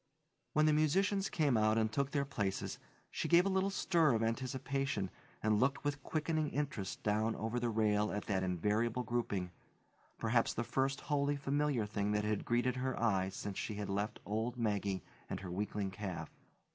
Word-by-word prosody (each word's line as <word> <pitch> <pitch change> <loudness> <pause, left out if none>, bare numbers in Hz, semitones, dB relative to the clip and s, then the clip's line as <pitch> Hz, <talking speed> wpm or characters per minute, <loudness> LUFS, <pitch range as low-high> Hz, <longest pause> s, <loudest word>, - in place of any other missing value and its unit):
When 155 0 +4
the 155 - +5
musicians 190 +6 +2
came 145 -6 +2
out 110 0 +3
and 110 -1 +2
took 140 +4 0
their 140 -1 0
places, 100 -8 -2 0.3
she - - -2
gave 175 +1 +6
a - - +2
little 190 0 +2
stir 165 -8 +3
of 115 - +1
anticipation 130 -2 -1 0.3
and 105 -1 +3
looked 135 +3 +2
with 145 0 -1
quickening 155 -1 0
interest 140 -11 -3
down 110 +2 +1
over 115 +2 -2
the 120 0 0
rail 105 -1 +2
at 105 - -3
that 95 -2 0
invariable 105 +7 0
grouping, 105 -7 -1 0.7
perhaps 115 +1 +2
the 120 - 0
first 135 +3 0
wholly 145 -1 +1
familiar 140 -4 0
thing 105 0 -1
that 105 0 +1
had 105 -1 -1
greeted 120 +1 +1
her 130 0 -1
eye 95 -5 +2
since 95 0 -5
she 105 - -3
had 105 -1 -4
left 100 +2 -2
old 110 +4 -2
Maggie 100 -4 0 0.3
and 95 - -3
her 90 -2 -6
weakling 100 +1 -2
calf. 95 -2 -5
115 Hz, 180 wpm, -35 LUFS, 105-140 Hz, 0.7 s, gave